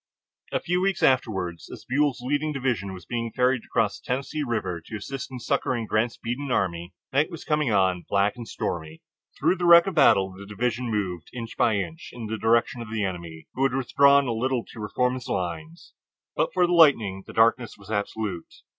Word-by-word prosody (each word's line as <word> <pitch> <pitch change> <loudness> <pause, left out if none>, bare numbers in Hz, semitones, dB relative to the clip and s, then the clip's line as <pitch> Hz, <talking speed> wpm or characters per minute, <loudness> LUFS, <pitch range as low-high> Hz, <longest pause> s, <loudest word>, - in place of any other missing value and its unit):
A - - 0
few 180 +1 -1
weeks 195 -1 0
afterward, 95 -10 +1
as - - -10
Buell's 140 -1 +1
leading 145 +4 0
division 125 -9 -2
was 95 -1 -10
being 115 -1 -3
ferried 125 0 +2
over 115 - +3
the 100 - -11
Tennessee 135 +4 -3
River 105 - -2
to 110 - -6
assist 135 +6 -6
in 130 - -6
succoring 120 0 -1
Grant's 110 +2 0
beaten 125 +4 -4
army, 90 -6 -1 0.2
night 145 +3 +2
was 165 -3 -8
coming 150 -5 +1
on, 95 -3 +2
black 100 +3 +2
and 120 -2 -8
stormy. 80 -1 -5 0.4
Through 170 +6 +2
the 175 - -1
wreck 170 0 +9
of 195 - -2
battle 105 - +4
the 100 +1 -11
division 120 +3 -2
moved, 95 -6 -3
inch 115 -2 -6
by 115 -3 +2
inch, 160 - -4
in 120 -2 -7
the 110 0 -4
direction 115 +1 +2
of 115 - -8
the 110 -2 -1
enemy, 85 -4 -6
who 130 - -5
had 135 -1 +2
withdrawn 140 +2 +4
a 120 - -1
little 125 +1 -1
to 115 - -10
reform 125 +4 0
his 130 -1 -6
lines. 85 -3 -5 0.4
But - - +1
for 180 -1 +3
the 175 - 0
lightning 115 - +4
the - - -10
darkness 115 +1 +2
was 100 +1 -12
absolute. 100 -3 -3
115 Hz, 200 wpm, -25 LUFS, 100-135 Hz, 0.4 s, wreck